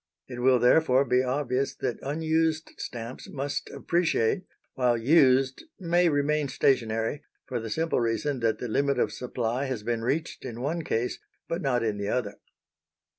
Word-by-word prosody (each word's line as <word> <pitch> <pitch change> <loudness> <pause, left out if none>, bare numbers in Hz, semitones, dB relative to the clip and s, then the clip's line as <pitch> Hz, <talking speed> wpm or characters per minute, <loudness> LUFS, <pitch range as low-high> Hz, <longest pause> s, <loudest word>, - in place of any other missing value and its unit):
It 125 -2 -7
will, 130 0 +5
therefore, 130 +2 +4
be 125 -1 +3
obvious 130 0 -1
that 125 -3 -3
unused 160 +2 0
stamps 120 +1 -7
must 140 +1 -3
appreciate 175 - 0 0.3
while 125 -2 +2
used 130 - +3
may 175 -1 +3
remain 145 0 +1
stationary, 120 0 +1 0.2
for 125 -2 -3
the 115 0 -6
simple 160 +6 0
reason 125 +4 -1
that 115 -2 +1
the 125 - -4
limit 140 +5 +1
of - - +1
supply 125 +1 -2
has 130 -6 -3
been 115 0 -1
reached 140 +8 -2
in 120 -3 -6
one 160 +6 -1
case 120 -3 -1 0.3
but 170 +2 -2
not 125 -4 +1
in 105 -2 -1
the 100 - -2
other. 105 -5 -2
130 Hz, 160 wpm, -27 LUFS, 120-150 Hz, 0.3 s, will